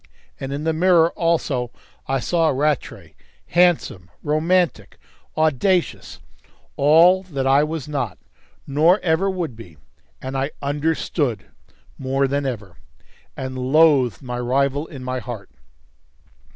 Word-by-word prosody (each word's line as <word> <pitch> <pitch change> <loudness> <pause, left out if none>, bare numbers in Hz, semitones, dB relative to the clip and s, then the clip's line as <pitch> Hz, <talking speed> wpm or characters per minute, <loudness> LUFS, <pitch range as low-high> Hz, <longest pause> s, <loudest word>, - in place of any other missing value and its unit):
And 135 - -5
in 145 +2 -4
the 160 0 0
mirror 170 0 +4
also 155 -7 -1 0.4
I 135 0 0
saw 165 +6 +1
Rattray, 145 0 -2 0.4
handsome, 170 - +2
romantic, 165 +4 0 0.4
audacious, 160 +4 0 0.6
all 165 +6 +5
that 145 -8 -4
I 135 +2 +4
was 155 -2 -4
not, 135 -10 -3 0.5
nor 160 +8 +3
ever 180 +3 +1
would 175 -9 -3
be, 90 -9 -13 0.4
and 130 +1 -6
I 135 +1 -1
"understood" 145 - -1 0.5
more 135 +1 0
than 140 +1 -1
ever, 100 - -6 0.6
and 130 0 -5
loathed 135 -2 +3
my 125 -1 -5
rival 140 +4 0
in 135 -5 -10
my 130 0 -3
heart. 115 -6 -8
145 Hz, 120 wpm, -21 LUFS, 130-165 Hz, 0.6 s, all